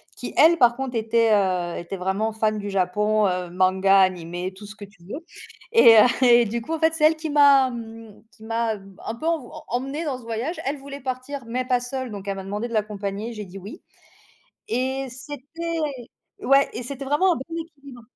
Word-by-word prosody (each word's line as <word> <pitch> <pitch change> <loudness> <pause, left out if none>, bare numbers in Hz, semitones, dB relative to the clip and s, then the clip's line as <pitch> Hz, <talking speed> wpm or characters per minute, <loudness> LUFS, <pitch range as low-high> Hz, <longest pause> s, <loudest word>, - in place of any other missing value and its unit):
qui, - - -7
elle, 335 +2 +6
par 240 -5 +5
contre, 265 -1 -4
était, 225 0 +2
heu, 185 -4 +1
était 175 +3 -6
vraiment 195 +4 -1
fan 215 -1 0
du 205 - -5
Japon, 210 +3 +1
heu, 180 -1 -2
manga, 190 +2 +3
animé, 180 0 0
tout 205 +2 -12
ce 215 - -10
que 205 - -10
tu 195 -3 -23
veux, 280 - -8 0.5
et 235 - +8
heu, 215 - +8 0.2
et 240 -1 +6
du 235 +3 -3
coup, 315 +8 -5
en 320 - -2
fait, 320 0 +3
c'est 315 -2 +2
elle 320 +1 +5
qui 315 0 -5
m'a 280 -3 +6
mmh, 225 -2 -10
qui 220 - -18
m'a 225 0 -1 0.3
un 225 - -4
peu 310 - -8
env 325 -7 -1 0.2
emmenée 270 +6 -3
dans 270 -4 -3
ce 245 - -15
voyage. 230 +9 -4
Elle 280 +2 -1
voulait 280 +1 -9
partir 255 +1 -5
mais 250 +2 -2
pas 250 -1 +2
seule, 255 0 -5
donc 200 -1 -8
elle 195 - -2
m'a 195 - -6
demandé 205 +5 -4
de 235 - -9
l'accompagner. 210 +1 -3
J'ai 210 -2 -7
dit: 185 +2 -11
«Oui» 200 - -10 0.9
et 265 +3 -1
c'était 290 +6 -6 0.6
ouais, 275 +2 +4
et 240 - -5
c'était 275 +2 -6
vraiment 300 +7 +3
un - - -4
bon 320 +5 -7
équilibre. 280 -6 -13
235 Hz, 210 wpm, -23 LUFS, 205-275 Hz, 0.9 s, et